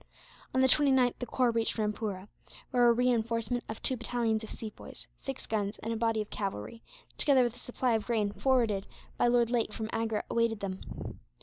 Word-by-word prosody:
On 260 - +4
the 260 - +6
29th 265 -3 +4
the 245 - -4
corps 250 0 +2
reached 230 0 0
Rampoora; 210 -2 -2 0.4
where 245 -1 +5
a - - +7
reinforcement 235 -1 +1
of 220 - -5
two 260 - +3
battalions 235 -2 -1
of 220 - -7
Sepoys, 215 -2 -8
six 270 -1 -6
guns, 210 -1 -2
and 225 +1 -1
a - - -2
body 225 -1 +1
of 210 - -21
cavalry, 200 - -4 0.4
together 275 -4 +5
with 240 -2 0
a - - -13
supply 245 0 -1
of 220 -1 -1
grain 215 -4 +1
forwarded 225 -5 +1 0.3
by - - +4
Lord 240 -1 +3
Lake 235 -3 +1
from 220 +1 -4
Agra, 225 -1 -1
awaited 230 -2 +1
them. 190 -1 -6
230 Hz, 190 wpm, -30 LUFS, 215-245 Hz, 0.4 s, a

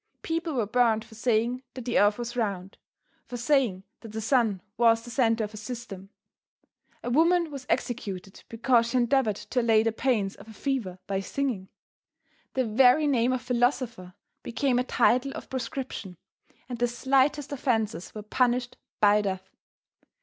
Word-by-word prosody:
People 330 -2 -2
were 235 -4 +1
burned 225 0 +2
for 225 - -16
saying 235 +2 0
that 255 -3 -7
the 240 - +2
earth 205 +1 +4
was 240 0 -5
round, 195 -5 -3 0.5
for 245 - -5
saying 240 -7 +1 0.2
that 225 -2 -11
the 220 - -3
sun 225 -4 +2 0.2
was 230 -1 +4
the 240 - -9
center 230 -2 +2
of 210 0 -5
a - - -8
system. 210 -4 -7 0.9
A 245 - -3
woman 335 +3 +3
was 270 -3 -8
executed 195 -5 -3
because 230 0 +2
she 255 - 0
endeavored 245 -3 +2
to 250 +4 -2
allay 225 -2 +4
the 225 - +1
pains 220 -4 0
of - - -14
a 220 - -11
fever 225 -6 -2
by 195 -1 -1
singing. 210 -2 -3 0.9
The 260 -1 +1
very 250 +7 +5
name 250 -4 +2
of 255 -1 -2
Philosopher 245 -6 -1 0.3
became 250 +1 0
a - - +1
title 250 +2 +2
of - - -9
proscription, 250 -7 -5 0.5
and 245 -2 -6
the 245 - +3
slightest 270 +4 +1
offences 220 - -1
were 210 - -6
punished 245 +2 0 0.2
by 210 0 +5
death. 190 -2 -4
235 Hz, 165 wpm, -27 LUFS, 215-255 Hz, 0.9 s, very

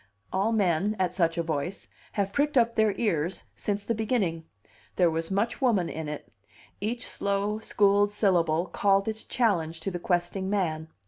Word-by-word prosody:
All 195 +4 +1
men, 200 -1 +2
at 185 -2 0
such 170 -3 +1
a 170 - +1
voice, 160 +3 -3 0.3
have 200 -1 -1
pricked 295 0 +1
up 235 -1 +4
their 220 -2 +3
ears 175 -5 -1
since 205 -1 -2
the 230 - 0
beginning; 210 -8 -1 0.5
there 175 -3 +4
was 165 +1 -2
much 205 +7 -1
woman 215 -9 +2
in 160 -1 -5
it; 150 - -6 0.5
each 230 +4 -2
slow, 200 +1 -1
schooled 205 -1 +3
syllable 175 -5 +2
called 195 +1 +2
its 220 0 -2
challenge 170 -9 0
to 175 +1 -3
questing 175 +2 -1
man. 160 -6 -1
195 Hz, 165 wpm, -27 LUFS, 170-210 Hz, 0.5 s, up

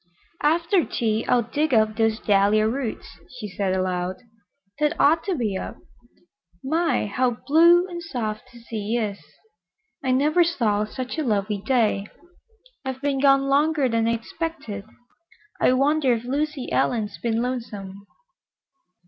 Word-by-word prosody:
"After 335 +4 +2
tea 220 -4 -1
I'll 245 -1 +3
dig 280 +4 0
up 215 -1 +3
those 225 -1 +1
dahlia 205 +1 +3
roots," 230 -9 -4 0.2
she 215 -4 -5
said 190 -1 -1
aloud. 185 0 -1 0.6
"They'd 300 +2 +1
ought 320 +3 +4
to 385 -3 0
be 220 -8 -1
up. - - -5 0.9
My, 325 +2 +1
how 245 +3 0
blue 340 +4 +5
and 345 -2 -6
soft 225 -10 -4
that 240 -1 -14
sea 220 0 -3
is! 205 -4 -2 0.8
I 260 - -1
never 295 +7 +3
saw 220 -11 0
such 255 +7 -5
a - - 0
lovely 210 -4 -1
day. 220 -6 +1 0.8
I've 265 -1 -5
been 280 -2 0
gone 275 0 +5
longer 285 +1 +2
than 230 -1 +1
I 230 - +2
expected. 230 - -5 0.8
I - - +5
wonder 275 0 +3
if 230 -1 -3
Lucy 285 +1 -2
Ellen's 215 -4 0
been 230 0 0
lonesome?" 205 -6 -6
245 Hz, 140 wpm, -24 LUFS, 215-290 Hz, 0.9 s, blue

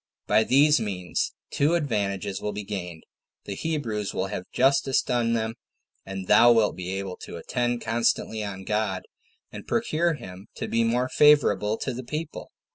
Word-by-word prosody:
By 110 - +4
these 145 +4 +5
means 95 -6 -2 0.2
two 150 +4 +2
advantages 100 - -1
will 105 - -3
be 105 +1 -5
gained; 90 -5 -6 0.4
the 100 - -4
Hebrews 115 -8 -3
will 95 - 0
have 95 -3 -6
justice 135 0 +3
done 120 -1 0
them, 110 -1 -1 0.5
and 95 -1 -5
thou 120 +5 +7
wilt 115 -3 +3
be 90 0 -5
able 95 -2 -5
to - - -9
attend 120 +7 -1
constantly 115 -1 0
on 95 -2 -6
God, 105 -2 -1 0.5
and - - -9
procure 165 +1 +1
him 95 -6 -10
to - - -4
be 115 0 +1
more 120 +2 +1
favorable 140 -8 +4
to 130 - -3
the 130 +2 -6
people." 155 +5 -6
110 Hz, 165 wpm, -26 LUFS, 100-130 Hz, 0.5 s, thou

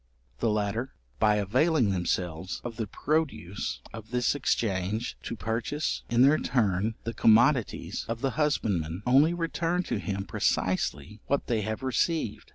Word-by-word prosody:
The 115 - +1
latter, 105 +4 -1 0.2
by 105 -1 +4
availing 125 - +2
themselves 90 -1 -2
of 120 -1 -6
the 110 -3 -2
produce 140 - -2
of 110 -1 -9
this 125 0 +1
exchange, 110 -5 -1
to - - -5
purchase 115 - -2
in 120 +1 +4
their 145 +3 +5
turn 105 -2 +1
the 115 - -3
commodities 115 +3 +3
of 115 0 -3
the 135 -1 +1
husbandman, 100 - 0
only 140 +7 +5
return 170 +1 -1
to - - -2
him 100 -1 -3
precisely 95 +1 -1
what 140 - 0
they 115 -3 0
have 110 +4 -4
received. 130 -2 -1
115 Hz, 145 wpm, -28 LUFS, 100-135 Hz, 0.2 s, their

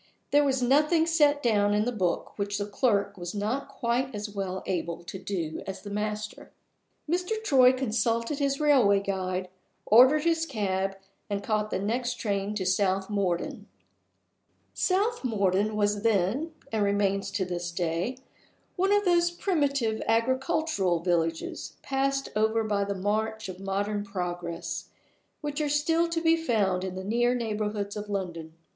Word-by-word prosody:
There 290 +1 +5
was 265 -2 +1
nothing 300 +6 +4
set 295 -3 +3
down 205 -3 +3
in 210 +1 +2
the 245 - 0
book 185 -7 -1
which 200 0 -1
the 205 - -2
clerk 205 -2 0
was 175 +2 -6
not 220 +7 -2
quite 255 -1 -1
as 210 0 -5
well 190 -2 -4
able 170 -2 -3
to 185 +2 -7
do 175 -5 -3
as 190 - -6
the 205 - -7
master. 210 +1 -4 0.6
Mr. 360 +6 0
Troy 260 -10 +6
consulted 230 +1 0
his 275 -1 0
railway 260 -10 +5
guide, 185 -2 -2 0.4
ordered 260 +7 +6
his 330 -1 +1
cab, 195 -6 -1 0.3
and 200 0 -2
caught 215 0 0
the - - -1
next 240 +5 -1
train 205 -2 -2
to 190 -3 -2
South 190 +1 +1
Morden. 190 -4 -1 1.1
South 410 +4 +1
Morden 205 -2 +1
was 205 -1 +1
then 225 - +1 0.2
(and 220 -2 +1
remains 200 -1 +1
to 195 -1 -1
this 175 -1 -3
day) 170 +7 -2 0.6
one 385 +2 +1
of 410 0 +3
those 345 -1 +4
primitive 280 - 0
agricultural 230 - +1
villages, 165 -2 -1
passed 275 0 0
over 220 +1 +2
by 205 -2 0
the 200 0 -3
march 215 +3 -1
of 185 -1 -7
modern 200 +2 -2
progress, 175 -3 -4 0.5
which 295 0 -3
are 295 - 0
still 325 +4 +2
to 335 -1 -1
be 325 0 +4
found 210 - +1
in 185 -1 -4
the 190 - -5
near 240 +4 +2
neighborhood 210 -3 -2
of 210 0 -6
London. 170 -5 -4
210 Hz, 155 wpm, -28 LUFS, 195-270 Hz, 1.1 s, Troy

